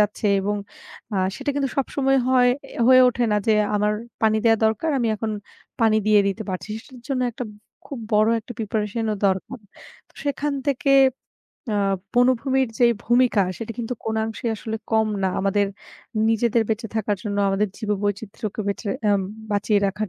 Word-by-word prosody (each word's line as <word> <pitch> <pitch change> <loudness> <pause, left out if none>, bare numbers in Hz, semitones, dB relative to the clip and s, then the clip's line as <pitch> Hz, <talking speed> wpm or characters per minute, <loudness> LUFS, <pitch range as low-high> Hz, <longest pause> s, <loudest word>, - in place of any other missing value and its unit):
যাচ্ছে 210 +1 +1
এবং 205 +2 -1 0.6
আ - - 0 0.2
সেটা - - -2
কিন্তু 275 -1 0
সবসময় 270 0 +1
হয় 250 -1 +5 0.2
এ্যা - - -1
হয়ে 255 0 +8
ওঠে 245 0 0
না - - +3
যে, 220 - +4 0.2
"আমার 210 +1 +2 0.3
পানি 220 0 +4
দেয়া 225 -1 +5
দরকার। 220 +9 0
আমি 235 -2 +1
এখন 220 +1 -3 0.5
পানি 220 -1 +4
দিয়ে 210 -1 +6
দিতে 210 +3 -3
পারছি।" 185 +3 -5 0.2
সেটার 250 -3 -14
জন্য 265 -2 0
একটা 250 +2 -5
ব - - -13 0.3
খুব 275 - -6 0.2
বড় 215 +1 +4
একটা 245 - -9
preparation 215 0 -2
ও - - -1
দরকার। 190 +6 -1 0.5
তো - - -28
সেখান 285 +1 -1 0.2
থেকে 275 0 +1 0.8
আ - - +1 0.4
বনভূমির 255 +1 +3
যেই 240 -1 +5
ভূমিকা, 240 -3 +3 0.2
সেটা 230 0 -5
কিন্তু 240 +1 -3
কোনো 220 0 -1
অংশেই 225 +1 -3
আসলে 220 +1 -4 0.2
কম 220 0 +4 0.2
না। 190 - +2
আমাদের 200 +1 +2 0.6
নিজেদের 225 0 +2
বেঁচে 220 +1 -2
থাকার 210 -1 0
জন্য, 205 -1 -2
আমাদের 200 +1 +1
জীব-বৈচিত্রকে 210 0 -3
বেঁচে 200 0 -2 0.2
আম 200 -1 +3 0.3
বাঁচিয়ে 205 +1 +2
রাখার 210 +2 -2
220 Hz, 170 wpm, -23 LUFS, 210-245 Hz, 0.8 s, হয়ে